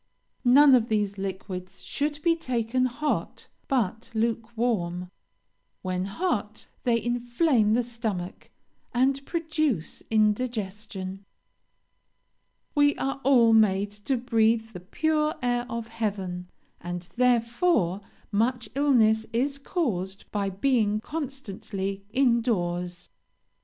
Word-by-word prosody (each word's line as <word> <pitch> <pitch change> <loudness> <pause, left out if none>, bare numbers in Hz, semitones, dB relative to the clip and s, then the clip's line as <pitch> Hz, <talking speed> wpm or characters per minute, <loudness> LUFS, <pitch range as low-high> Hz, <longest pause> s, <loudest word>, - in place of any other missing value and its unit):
None 280 +2 +8
of 240 -2 +4
these 205 -2 0
liquids 190 -1 -6
should 295 +1 -2
be 335 -1 +4
taken 255 -4 0
hot, 285 +4 -2 0.2
but 230 -3 0
lukewarm; 220 -6 -1 0.7
when 185 0 -1
hot 215 - -2 0.2
they 235 -2 +3
inflame 240 0 +2
the 245 - +2
stomach, 220 -7 -5 0.5
and 270 +2 +2
produce 310 - -1
indigestion. 210 -3 -1 1.5
"We 290 -1 +4
are 270 0 -3
all 240 -4 +5
made 205 -2 +4
to 210 +6 -2
breathe 225 -2 +2
the 180 - -8
pure 305 - 0
air 245 0 0
of 230 -1 -4
heaven, 195 -6 -3 0.3
and 175 0 -5
therefore 235 - +2 0.3
much 235 +3 0
illness 230 -6 +3
is 275 +4 0
caused 195 - -2
by 200 -2 -1
being 215 0 +1
constantly 215 -9 -5
in 240 -1 +3
doors. 175 -6 -2
230 Hz, 105 wpm, -27 LUFS, 200-255 Hz, 1.5 s, None